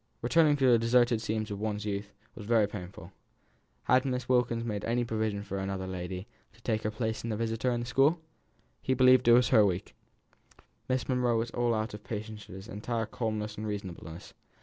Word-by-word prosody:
returning 150 +3 +4
to 135 - +2
the 120 -2 +6
deserted 120 0 +3
scenes 110 0 -2
of 100 - -4
one's 105 -1 -3
youth 100 0 -3 0.2
was 105 - -10
very 110 -3 +4
painful... 90 -2 -9 0.7
Had 130 +1 +4
Miss 125 -2 -2
Wilkins 125 -2 +2
made 105 -3 -3
any 120 +1 0
provision 110 -3 -2
for 100 -1 -4
another 95 -1 -3
lady 90 0 -5 0.3
to 115 - -22
take 110 -2 0
her 110 - -1
place 110 +1 -3
as 115 - -3
visitor 115 +2 -1
at 120 -1 0
the - - -4
school? 135 +7 +3 0.6
He 130 - 0
believed 130 -1 +5
it 120 - +8
was 120 0 +5
her 110 -5 +6
week. 95 -1 -1 1.0
Miss 130 -1 0
Monro 125 -2 +2
was 115 +1 -2
out 115 -2 0
of 105 - -6
all - - -30
patience 105 -1 -6
at 95 - -9
his 95 +2 -9
entire 115 +1 -3
calmness 110 -2 -3
and 110 - -4
reasonableness. 95 -4 -7
110 Hz, 195 wpm, -30 LUFS, 105-120 Hz, 1.0 s, it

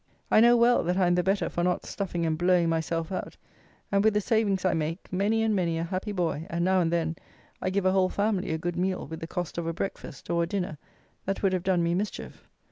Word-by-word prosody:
I - - +6
know 240 +1 +6
well, 240 +1 +4
that 180 +2 0
I 190 - +3
am 175 - +3
the 180 - +3
better 195 +3 +1
for 175 - -2
not 180 0 0
stuffing 175 -4 -3
and 160 -1 +1
blowing 175 0 +3
myself 165 +1 -1
out, 185 - -5 0.5
and 200 0 +3
with 220 -1 +3
the - - +4
savings 205 -3 +1
I 185 - +3
make 165 +4 -3
many 210 +4 +1
and 220 -1 +2
many 170 -3 0
a 165 - -1
happy 185 +4 -3
boy; 170 -4 -2
and, 170 +1 -1
now 185 0 +3
and 165 -1 +1
then, 165 -1 -1 0.4
I 185 - 0
give 190 0 -1
a 185 - +4
whole 190 -1 +3
family 200 -2 0
a 160 - 0
good 175 +1 -3
meal 185 +1 -1
with 160 +3 -7
the 165 - -6
cost 175 0 -4
of 165 - -3
a 165 - -1
breakfast, 175 -4 -6
or 170 0 +2
a 170 - 0
dinner, 180 -5 -3 0.5
that 195 +1 -3
would 195 -1 +3
have 185 - 0
done 180 -1 +1
me 170 0 +1
mischief. 200 +4 -4
180 Hz, 255 wpm, -27 LUFS, 170-195 Hz, 0.5 s, I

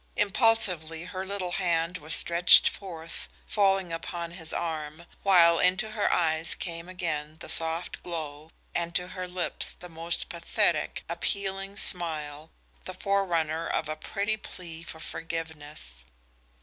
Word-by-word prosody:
Impulsively 195 -7 +3
her 185 +1 -5
little 190 -3 -3
hand 170 -1 0
was 155 +2 0
stretched 170 +1 +6
forth, 165 -4 -5 0.2
falling 195 -4 +2
upon 170 0 -4
his 165 -2 -6
arm, 160 -1 -4 0.2
while 170 -4 +6
into 185 +4 +3
her 210 -1 +1
eyes 160 -1 +2
came 170 -1 -5
again 155 -4 -3
the - - -9
soft 165 +1 +1
glow 155 -3 -6 0.2
and 170 0 -2
to 180 0 +1
her 185 0 -5
lips 180 -1 -1
the 180 - -11
most 165 +1 -2
pathetic, 170 -2 0
appealing 195 +3 -2
smile, 155 -6 +2 0.4
the 185 - -6
forerunner 170 -5 0
of 155 - -1
a 155 - -3
pretty 205 +7 -1
plea 170 -5 -9
for 160 -1 -9
forgiveness. 155 - -6
170 Hz, 135 wpm, -28 LUFS, 160-185 Hz, 0.4 s, stretched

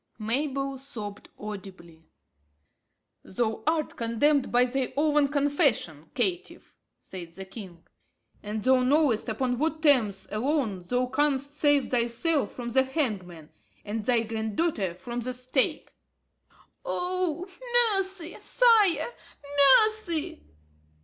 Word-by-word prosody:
Mabel 275 +4 -1
sobbed 210 -7 -8
audibly. 185 -6 -10 1.1
"Thou 220 +2 -2
art 315 -1 0
condemned 255 +5 +1
by 245 +1 +4
thy 260 +1 -2
own 295 -1 +3
confession, 280 - 0
caitiff," 370 0 -2 0.2
said 175 -3 -10
the 190 +2 -8
king, 190 -4 -11 0.6
"and 210 0 -5
thou 260 +1 +4
knowest 255 -3 +2
upon 245 +2 -1
what 315 +1 -1
terms 220 -10 +3
alone 220 - -1
thou 250 +5 +1
canst 280 +1 0
save 290 -2 +2
thyself 250 +6 0
from 240 -1 -6
the 265 +3 +4
hangman, 205 - -3 0.3
and 215 +1 -3
thy 240 -1 +3
grand 220 -1 -4
daughter 205 - 0
from 235 +6 -6
the 250 +1 -3
stake." 255 +1 -1 0.9
"Oh, 360 -2 -1 0.5
mercy, 380 -3 -3
sire, 455 -5 +3 0.7
mercy!" 360 - -2
255 Hz, 110 wpm, -27 LUFS, 215-295 Hz, 1.1 s, by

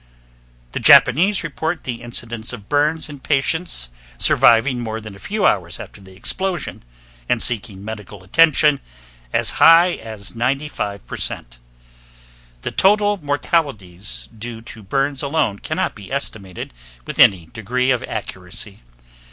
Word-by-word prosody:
The - - -3
Japanese 180 - +6
report 160 - -3
the 120 -2 -5
incidence 120 -1 -4
of 105 -4 -9
burns 150 +2 +1
in 145 -2 -10
patients 140 - 0 0.3
surviving 120 - +4
more 110 -2 -4
than 110 -2 -10
a - - -14
few 210 - -2
hours 85 -4 +1
after 105 - -10
the 95 -1 -15
explosion, 185 - -3 0.5
and - - +2
seeking 105 -4 -1
medical 105 -3 -8
attention, 150 - +4 0.5
as - - +3
high 170 +2 +8
as 105 -4 -5
95%. 115 - -3 1.0
The - - -3
total 205 +1 +3
mortalities 105 - -1
due 115 +1 -7
to 110 -1 -9
burns 135 +7 -1
alone 140 -8 0
cannot - - -2
be 100 +1 -12
estimated 100 - -4 0.3
with - - -7
any 90 -5 +6
degree 125 +4 0
of 125 - 0
accuracy. 95 0 -4
120 Hz, 125 wpm, -20 LUFS, 100-145 Hz, 1.0 s, high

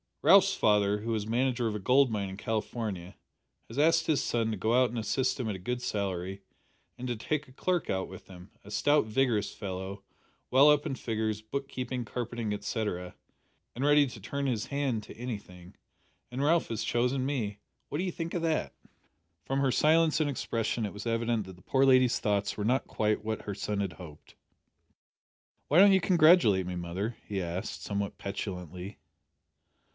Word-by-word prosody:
"Ralph's 195 0 +7
father, 105 - +2
who 115 +1 -2
is 105 -1 -2
manager 120 +1 +1
of 110 - -2
a - - -3
gold 130 +5 +4
mine 100 -3 -2
in 95 - -8
California, 105 -4 -3 0.5
has 115 - -10
asked 165 +3 +4
his 155 -3 +1
son 115 -1 0
to 110 - -3
go 110 +5 0
out 125 0 +4
and 120 - -5
assist 130 +5 0
him 125 - -2
at 105 - -2
a - - -7
good 125 +6 -3
salary, 95 -3 -3 0.6
and 125 - -5
to 120 - -1
take 150 +7 -2
a - - -16
clerk 175 +6 -1
out 95 0 -1
with 95 - -11
him 90 +1 -13
a 100 - -13
stout 145 +5 +3
vigorous 110 -2 +1
fellow, 95 0 -6 0.5
well 135 +3 +7
up 150 -1 +4
in 140 - -2
figures, 110 -3 -2
book 135 +6 -4
keeping, 125 -2 -4
carpenting, 120 -1 -4
etcetera, 105 -4 -3 0.6
and 125 - -3
ready 145 0 +5
to 120 -3 -9
turn 140 +8 -3
his 115 -5 -1
hand 140 -6 -1
to - - -12
anything, 100 -7 -7 0.6
and 130 +3 -2
Ralph 165 +3 +3
has 115 -1 -2
chosen 125 +2 0
me! 110 -8 -2 0.3
What - - -3
d'ee 185 0 -1
think 165 0 -5
o' - - +1
that?" 165 -2 -1 0.7
From 135 +1 -1
her 135 -1 +2
silence 155 +3 +3
and 155 -2 +1
expression 115 -3 -2
it 100 - -5
was 105 +3 -7
evident 115 -2 0
that 95 -1 -10
the 90 - -20
poor 135 0 +3
lady's 130 -2 +5
thoughts 105 -1 0
were 105 - -2
not 125 +4 +1
quite 105 0 0
what 110 0 -3
her 100 - -5
son 100 +1 -3
had 100 -3 -2
hoped. 80 -5 -13 1.3
"Why 150 - +2
don't 200 +1 +8
you 190 - +4
congratulate 160 - +5
me, 90 - -4
mother?" 90 +6 -4
he 100 -2 -2
asked, 90 +2 -4
somewhat 100 -1 -3
petulantly. 90 -1 -6
115 Hz, 190 wpm, -29 LUFS, 100-135 Hz, 1.3 s, don't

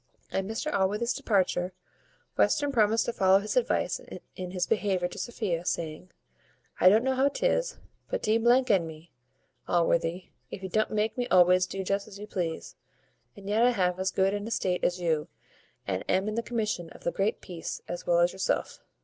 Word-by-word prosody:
At 195 - -1
Mr 225 +9 -3
Allworthy's 210 +5 +1
departure, 185 -3 0 0.6
Western 290 -1 +2
promised 225 -2 +3
to 240 - -2
follow 190 -2 +5
his 205 +2 -3
advice - - +1 0.3
in 185 -1 -5
his 180 -1 -1
behaviour 195 -5 0
to 180 - -9
Sophia, 185 -5 -2
saying, 170 0 -3 0.7
"I 185 - +8
don't 215 +4 +4
know 265 0 +1
how 265 +2 +3
'tis, - - 0 0.3
but - - -2
d 220 +2 +2
n 240 -8 +4
me, 160 +1 -12 0.6
Allworthy, 170 +1 +1 0.2
if 190 - -8
you 190 - -4
don't 215 +4 +1
make 215 +2 -1
me 245 - 0
always 180 0 +5
do 195 +1 -4
just 200 +2 -1
as 200 -2 -11
you 205 - -7
please; 175 -6 -4 0.6
and 200 -1 -11
yet 210 +2 +2
I 245 - +6
have 180 -4 0
as 190 0 +1
good 195 0 +1
an 205 +1 -3
estate 185 -5 -1
as 180 0 +1
you, 160 -3 0 0.6
and 95 -1 -2
am 190 +2 +2
in 215 - -2
the 230 - 0
commission 215 -8 -2
of - - -15
the 195 +5 0
peace 170 -3 -7
as 175 - -6
well 170 0 +4
as 175 +1 +3
yourself." 190 - -1
195 Hz, 185 wpm, -28 LUFS, 180-220 Hz, 0.7 s, I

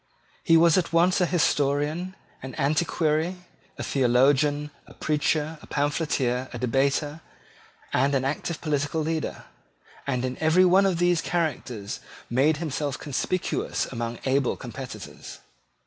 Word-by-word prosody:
He 165 - +5
was 170 +1 +5
at 175 - -3
once 175 +3 +3
a 180 - +3
historian, 155 +2 0 0.3
an 130 0 -7
antiquary, 155 +3 +1 0.4
a - - -4
theologian, 140 +3 +2 0.2
a - - -15
preacher, 150 +1 0
a - - -14
pamphleteer, 140 -4 0
a 120 - -6
debater, 140 +5 0 0.7
and 140 +2 +2
an 130 -1 +1
active 155 +4 -3
political 150 +1 -1
leader; 160 +1 -3 0.6
and 130 -2 0
in 130 0 -4
every 160 +4 +5
one 190 +2 +5
of 185 -3 0
these 175 -1 +2
characters 125 -12 -2 0.3
made 145 +6 +3
himself 145 -3 -2
conspicuous 160 +6 -2
among 115 -1 -4
able 135 0 +1
competitors. 130 +1 -8
150 Hz, 130 wpm, -26 LUFS, 135-165 Hz, 0.7 s, He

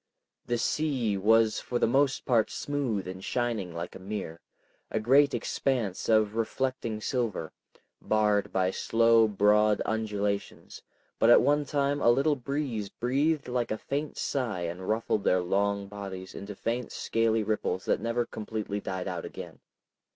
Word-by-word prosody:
The 120 - 0
sea 125 -4 0
was 110 +2 +3
for 125 - -3
the - - +3
most 135 +3 +1
part 115 -4 +3
smooth 130 -10 -2
and 95 +1 -7
shining 115 -7 -2
like 85 +1 -6
a - - -9
mirror, 95 -4 -6 0.5
a - - -1
great 140 +6 +4
expanse 115 -9 -1
of 110 -2 +3
reflecting 115 -1 -2
silver, 115 - -2 0.5
barred 105 -1 +1
by 95 -1 +1
slow 115 +2 +4
broad 105 +1 +3
undulations, 105 -2 -3 0.4
but 115 - +4
at 120 - +7
one 145 +1 +2
time 145 0 0
a - - +5
little 140 +5 +3
breeze 130 -6 -3
breathed 140 +7 0
like 125 -1 -1
a 110 - -1
faint 145 +5 -4
sigh 120 -10 -2
and 90 +2 -4
ruffled 110 -2 0
their 90 - +3
long 100 +2 0
bodies 95 -2 -7
into 100 +1 -7
faint 115 +4 -3
scaly 115 -1 0
ripples 105 -3 -2
that - - +1
never 115 +1 0
completely 105 -2 -4
died 95 -2 -4
out 90 -3 -4
again. - - -9
110 Hz, 150 wpm, -28 LUFS, 100-125 Hz, 0.5 s, at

